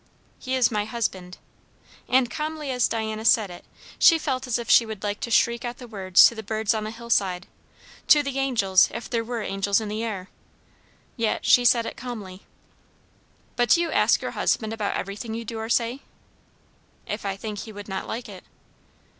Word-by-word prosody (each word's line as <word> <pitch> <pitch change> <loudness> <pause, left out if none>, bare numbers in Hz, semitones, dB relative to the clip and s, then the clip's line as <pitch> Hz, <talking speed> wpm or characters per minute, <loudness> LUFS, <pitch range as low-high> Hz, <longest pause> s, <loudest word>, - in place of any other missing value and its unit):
"He 260 0 -3
is 250 -3 +3
my 210 -1 -1
husband." 190 -6 -4 0.7
And 250 -1 +3
calmly 305 -1 -4
as 250 -2 +2
Diana 220 -1 -3
said 220 -4 +3
it, 175 - -11 0.4
she 330 - +7
felt 265 -4 -3
as 245 - 0
if 235 - -6
she - - +6
would 220 -3 -8
like 205 0 -2
to - - -4
shriek 235 0 +2
out 240 0 -5
the 245 - -10
words 190 -5 +5
to - - +4
the 220 - -7
birds 220 +1 -1
on 215 -1 -3
the - - -4
hillside 205 -5 -1 0.6
to 295 -1 +6
the 275 -1 -3
angels, 205 -9 +3
if 235 - -6
there 230 -2 -1
were 230 -1 -4
angels 195 +1 0
in 215 -2 -5
the 215 +2 -3
air. 200 -5 -5 0.9
Yet 230 -2 -1
she 245 - +5
said 235 -1 +4
it - - -6
calmly. 205 -7 -8 1.1
"But 240 -1 +1
do 340 - +5
you 335 -2 -1
ask - - +3
your - - -3
husband 220 -1 -1
about 215 -3 -2
everything 210 +4 -5
you 230 0 -5
do 225 0 -5
or 220 0 -5
say?" 235 +2 0 1.1
"If 210 - -5
I 195 -1 -2
think 210 0 -6
he 220 - -8
would 205 -1 -10
not 190 -1 -5
like 235 +2 -5
it." - - -11
225 Hz, 195 wpm, -24 LUFS, 205-245 Hz, 1.1 s, she